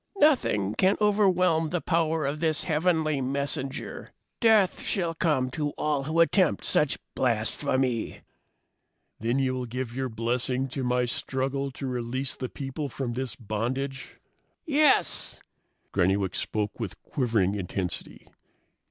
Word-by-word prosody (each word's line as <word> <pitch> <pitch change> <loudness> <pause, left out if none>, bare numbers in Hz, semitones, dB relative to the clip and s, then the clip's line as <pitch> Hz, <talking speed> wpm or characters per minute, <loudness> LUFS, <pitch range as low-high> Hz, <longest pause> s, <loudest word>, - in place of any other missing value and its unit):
"Nothing 175 - +3
can 190 - +3
overwhelm 185 -6 +3
the 175 - 0
power 160 -2 +1
of 145 +2 -2
this 160 -1 +1
heavenly 160 -3 +1
messenger! 135 0 -3 0.3
Death 220 -5 +4
shall 170 -4 -1
come 150 -6 +1
to 145 +2 -2
all 150 -2 0
who 160 +3 +2
attempt 180 0 +3
such 150 - +2 0.2
blasphemy!" 125 +1 0 1.0
"Then 115 +4 0
you 130 -1 +1
will 125 -1 -3
give 120 0 -4
your 130 0 -2
blessing 125 +3 -1
to 135 +1 -3
my 125 0 +1
struggle 135 +3 -2
to 135 - -6
release 130 +1 -2
the 130 - -4
people 140 +1 -5
from 125 -2 -3
this 125 -2 -4
bondage?" 130 +5 -4 0.5
"Yes!" 300 -2 +2 0.5
Granny 95 +1 +3
Wicks 95 -2 -2
spoke 105 +1 -2
with 110 -6 -5
quivering 115 -8 +1
intensity. 95 -2 -4
135 Hz, 130 wpm, -27 LUFS, 120-160 Hz, 1.0 s, Death